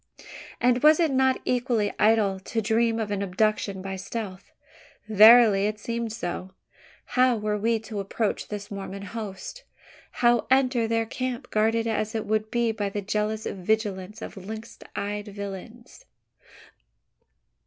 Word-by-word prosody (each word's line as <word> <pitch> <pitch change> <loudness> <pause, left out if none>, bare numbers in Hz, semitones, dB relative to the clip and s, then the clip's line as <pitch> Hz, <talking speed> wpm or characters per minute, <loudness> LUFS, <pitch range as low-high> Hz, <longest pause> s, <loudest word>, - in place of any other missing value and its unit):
And 245 0 +3
was 305 +2 +6
it 325 -4 +3
not 265 0 +2
equally 245 -4 0
idle 210 -3 +3
to 225 +4 -3
dream 225 +1 +1
of 215 -2 -3
an 200 -1 -1
abduction 200 0 0
by 195 0 -4
stealth? 195 -1 -6 0.6
Verily, 215 -1 +7
it 215 0 -3
seemed 235 -1 -3
so. 185 -3 -5 0.5
How 250 -2 +3
were 210 0 -1
we 230 +2 +2
to 220 -2 -6
approach 200 +2 -2
this 205 0 -7
Mormon 195 0 -6
host? 210 - -7 0.5
How 240 -1 +2
enter 255 -3 +3
their 225 0 +1
camp, 255 +2 -4
guarded 225 +1 +2
as 215 -1 -1
it 220 - -2
would 215 0 0
be 235 -1 +1
by 210 -2 -2
the 205 +1 -4
jealous 215 +2 -1
vigilance 205 +1 -2
of - - -8
lynx 220 +4 -8 0.2
eyed 205 +1 -3
villains? 205 - -9
220 Hz, 145 wpm, -26 LUFS, 200-235 Hz, 0.6 s, Verily